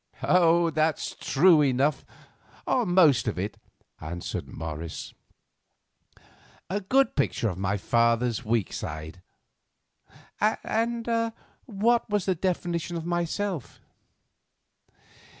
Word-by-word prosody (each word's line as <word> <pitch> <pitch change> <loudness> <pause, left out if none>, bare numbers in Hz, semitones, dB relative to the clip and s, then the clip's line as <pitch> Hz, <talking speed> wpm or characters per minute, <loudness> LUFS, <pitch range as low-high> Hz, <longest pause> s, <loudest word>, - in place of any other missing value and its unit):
"That's 165 0 +2
true 160 +2 +4
enough, 140 +2 +1 0.6
or 245 -5 +1
most 170 -10 +4
of 110 - -1
it," 100 +3 -4 0.4
answered 85 +3 -5
Morris, 80 +1 -6 1.6
"a 200 +2 -1
good 260 +6 +2
picture 130 -5 0
of 90 -2 -6
my 100 +1 0
father's 115 +2 +1
weak 110 -2 0
side. 80 +3 -6 1.2
And 230 +2 0 0.6
what 230 +2 +1
was 205 -3 0
his 185 -3 0
definition 175 -1 -2
of 165 - -6
myself?" 175 - -3
160 Hz, 95 wpm, -26 LUFS, 115-190 Hz, 1.6 s, true